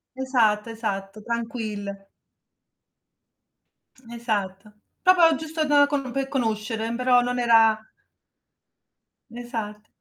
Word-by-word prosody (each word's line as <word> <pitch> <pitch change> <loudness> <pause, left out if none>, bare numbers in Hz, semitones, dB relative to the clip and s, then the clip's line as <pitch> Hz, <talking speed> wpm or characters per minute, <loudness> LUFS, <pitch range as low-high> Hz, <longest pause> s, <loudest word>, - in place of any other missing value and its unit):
Esatto, 235 -5 +1
esatto, 210 -2 -5
tranquille. 215 -4 -5 2.0
Esatto. 210 -4 -4 0.3
Proprio 350 -3 +5
giusto 315 +1 -3
da 290 -1 +5
com 275 -3 -2
per 270 +1 -2
conoscere, 225 -3 -2
mhmm, 235 - -3
però 250 0 +3
non 245 0 -2
era 225 -2 +5 1.6
Esatto. 220 -3 -6
235 Hz, 90 wpm, -24 LUFS, 215-255 Hz, 2.0 s, Proprio